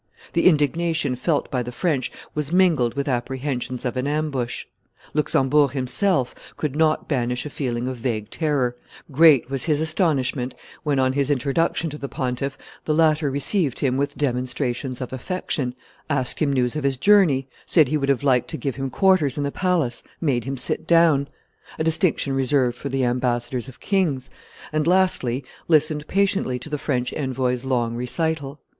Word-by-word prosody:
The 170 - +4
indignation 160 -2 +2
felt 145 +5 -1
by 125 - 0
the 125 0 -5
French 140 -2 -1 0.2
was 150 0 -2
mingled 165 -10 +3
with 140 0 -2
apprehensions 130 0 -3
of 125 - -2
an 130 +2 -1
ambush. 145 -5 -2 0.5
Luxembourg 145 -1 +2
himself 135 +2 +1 0.2
could 150 -3 -2
not 155 0 +2
banish 125 -3 -1
a 150 - -6
feeling 125 -3 -2
of 130 -1 -4
vague 115 -3 -3
terror; 140 -6 0 0.4
great 140 -3 +5
was 135 -2 0
his 150 -3 +2
astonishment 145 -6 0 0.3
when, 145 -3 0
on 130 0 +2
his 140 0 +1
introduction 145 +5 0
to 150 - -8
the 140 - -5
pontiff, 130 +2 -3 0.3
the 155 - +1
latter 155 -2 +3
received 145 - 0
him 130 -3 +1
with 140 +1 -1
demonstrations 130 -1 -2
of 125 - -5
affection, 130 -2 -2 0.3
asked 130 -4 -1
him 150 -3 +2
news 125 -2 0
of 150 - -2
his 135 -1 +1
journey, 160 -6 +4 0.2
said 155 -5 +5
he 150 - -1
would 140 -1 -1
have 140 -1 +1
liked 130 -4 +3
to 160 - -5
give 135 -4 -3
him 135 0 -2
quarters 165 -3 +2
in 145 - -1
the 140 - -1
palace, 170 -10 0 0.2
made 130 -8 0
him 135 0 -3
sit 125 - 0
down, 165 -5 +4 0.5
a - - -1
distinction 160 -3 +1
reserved 130 -2 +1
for 140 - -6
the 135 0 0
ambassadors 120 0 -1
of 130 - -12
kings, 160 -10 0 0.4
and, 155 0 +1
lastly, 170 -9 +2 0.2
listened 155 -2 +2
patiently 195 -9 +1
to 155 - -9
the 150 - -2
French 125 -4 -1
envoy's 130 -3 -1
long 120 -3 0
recital. 145 +3 -2
140 Hz, 170 wpm, -23 LUFS, 125-155 Hz, 0.5 s, great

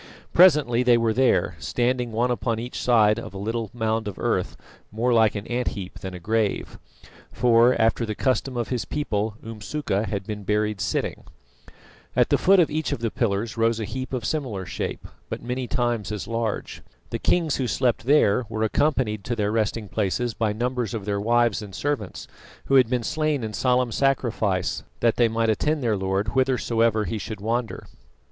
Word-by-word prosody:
Presently 150 -9 +5
they 125 -1 +5
were 115 -1 +1
there, 130 +2 +2
standing 125 0 -1
one 120 +3 +1
upon 115 -1 -1
each 120 +2 -5
side 110 -3 +4
of 100 - -9
a - - -4
little 110 +2 -3
mound 110 -2 -1
of 100 - -5
earth - - -1 0.3
more 120 +4 +1
like 110 -2 +4
an 105 0 -4
ant 120 +1 -2
heap 95 -2 -7
than 95 -1 -6
a - - -7
grave; 110 +3 -1 0.5
for, 120 +1 +4
after 115 +1 +2
the 110 -2 -3
custom 130 0 0
of 120 - -2
his 125 -3 -1
people, 110 -7 -2
Umsuka 110 -1 -3
had 100 -2 -3
been 105 0 -5
buried 105 0 0
sitting. - - -2 0.9
At - - +3
the - - +3
foot 195 +1 +5
of 165 - +3
each 155 +1 -1
of - - 0
the 115 -2 -1
pillars 110 0 -1
rose 115 0 +2
a 110 - -2
heap 130 +4 -5
of 125 -4 -3
similar 115 -10 -2
shape, - - -5 0.2
but - - -5
many 125 +1 -3
times 120 -6 -1
as 105 -2 -4
large. 115 -2 -3 0.3
The - - -2
kings 165 -4 +1
who 130 - -1
slept 120 -2 0
there 125 -5 +3
were 110 -1 -2
accompanied 110 -3 +1
to 120 - -1
their 105 -2 0
resting 110 -1 -1
places 110 +4 -1
by 110 -1 0
numbers 120 0 -2
of 105 -3 -5
their 100 -1 -1
wives 115 -2 +2
and 100 -3 -9
servants, 140 -10 -3 0.4
who - - -2
had 130 -4 +6
been 125 -2 0
slain 155 0 0
in 110 -1 -4
solemn 125 +1 +1
sacrifice 115 -9 0 0.2
that 115 -2 +2
they 120 - +5
might 115 0 0
attend 150 +6 0
their 115 -3 +2
Lord 95 +1 -1
whithersoever 115 -3 +1
he 110 - -3
should 110 +2 -6
wander. 115 +2 -2
115 Hz, 190 wpm, -24 LUFS, 105-125 Hz, 0.9 s, had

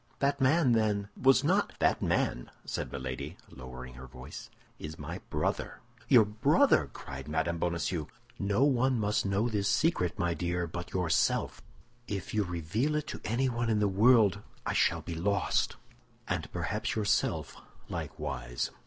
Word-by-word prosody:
"That 140 0 0
man, 135 +1 +4
then, 105 -3 +1
was 135 0 +4
not—" - - +2
"That - - +2
man," - - 0 0.2
said - - -4
Milady, 65 -2 -5
lowering 65 0 -9
her 65 +1 -10
voice, 65 +3 -10 0.3
"is 80 +1 -7
my - - -6
brother." - - -2 0.3
"Your 120 -4 +7
brother!" 135 - +3
cried 70 0 -8
Mme. 80 +2 0
Bonacieux. 85 -2 -1 0.3
"No 100 +6 +2
one 130 -3 +3
must 105 -1 +1
know 100 +4 +1
this 100 -4 0
secret, 100 - +1
my 85 0 +1
dear, 85 0 -1
but 85 +1 -6
yourself. 90 -3 +1 0.5
If 100 -3 -4
you 105 -1 +2
reveal 90 - -1
it 150 -1 -1
to - - -6
anyone 120 0 0
in 110 - +2
the 105 -1 +3
world, 105 0 +4 0.2
I - - -1
shall - - +2
be 85 - -6
lost, 95 +4 0 0.5
and - - -2
perhaps - - -2
yourself 105 -2 0 0.3
likewise." 65 -5 -4
100 Hz, 150 wpm, -30 LUFS, 80-120 Hz, 0.5 s, Your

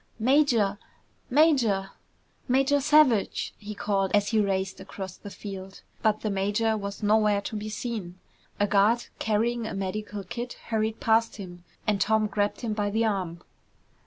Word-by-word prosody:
"Major! 235 -5 +3 0.5
Major! 245 -10 +3 0.6
Major 270 +2 +3
Savage!" 280 -7 +3
he 210 0 -7
called 195 -2 0
as 205 0 +2
he 220 - +2
raced 195 -1 -1
across 190 -2 -7
the 205 - -10
field. 195 -1 -9 0.2
But 215 -1 +2
the 215 - -1
major 205 +3 +1
was 200 0 -5
nowhere 210 -1 +3
to 215 - -6
be 215 0 -4
seen. 210 -5 -5 0.4
A 205 - +4
guard 210 +4 +3
carrying 225 +2 0
a 210 - -5
medical 200 +1 -4
kit 240 +6 -5 0.2
hurried 220 -1 -1
past 225 0 +2
him 175 -4 -9 0.2
and 205 -2 +1
Tom 220 +1 +3
grabbed 205 -1 -1
him 230 -3 -2
by 205 -1 -1
the 220 +2 +1
arm. 185 -5 -2
210 Hz, 155 wpm, -27 LUFS, 200-225 Hz, 0.6 s, A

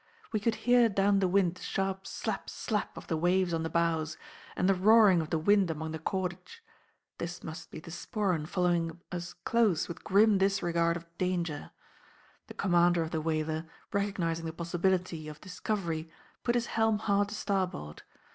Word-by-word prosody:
We 215 - +1
could 220 +2 +1
hear 245 -1 +6
down 200 0 +3
the 190 - +2
wind 180 -2 +3
the - - -14
sharp 195 0 -2
'slap - - -4
slap' 210 -2 -3
of - - -8
the 165 - -1
waves 175 +2 +2
on 165 - 0
the 160 - -2
bows, 160 -2 0 0.4
and 185 - +1
the 195 - +5
roaring 200 -1 +6
of 155 - -5
the 165 - +1
wind 195 +3 +3
among 160 0 -3
the 160 - -5
cordage. 185 - -4 0.6
This 175 +1 -5
must 160 0 -7
be - - -8
the 165 - -11
Sporran 175 -2 -1
following 175 -2 0
us 175 -1 -5
close 210 -1 +1
with 170 0 -8
grim 205 +1 +4
disregard 170 -4 +2
of 170 - -11
danger. 175 -5 -1 0.8
The - - -10
commander 175 -2 +3
of 160 - -6
the 160 - -1
whaler, 155 0 -1 0.3
recognising 180 -5 -1
the 160 - -4
possibility 175 -1 -1
of 150 0 -8
discovery, 180 -4 -3 0.3
put 240 - 0
his 240 -1 +1
helm 220 -1 +3
hard 205 -1 +1
to 215 - -5
starboard. 185 - -2
180 Hz, 175 wpm, -30 LUFS, 165-200 Hz, 0.8 s, hear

